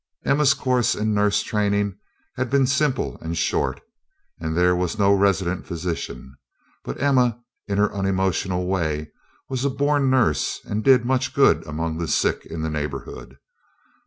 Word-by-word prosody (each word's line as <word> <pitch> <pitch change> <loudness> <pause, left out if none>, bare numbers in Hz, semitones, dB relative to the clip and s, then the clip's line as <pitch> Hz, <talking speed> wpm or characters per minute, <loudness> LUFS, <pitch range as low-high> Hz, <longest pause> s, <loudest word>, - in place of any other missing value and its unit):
Emma's 140 0 +3
course 125 -3 +1
in 110 0 -1
nurse 105 0 +2
training 100 -2 0 0.4
had 130 0 -2
been 135 -1 +3
simple 140 0 0
and 80 +1 -4
short - - 0 0.6
and 80 0 -3
there 90 0 +4
was 90 +3 -2
no 100 -1 +4
resident 95 -2 +1
physician; 80 -7 -5 0.5
but - - -6
Emma, 125 -4 +2 0.3
in 100 -1 -1
her 105 0 +2
unemotional 95 -2 0
way, 80 -5 -2 0.4
was 130 -1 -3
a 140 - +2
born 140 0 +1
nurse 115 - +1
and 105 +1 -3
did 125 -2 +5
much 130 +1 0
good 135 -1 +4
among 80 +1 -3
the 85 - -2
sick - - 0
in 80 -1 -5
the 80 - -1
neighborhood. 75 -2 -6
100 Hz, 155 wpm, -23 LUFS, 85-130 Hz, 0.6 s, did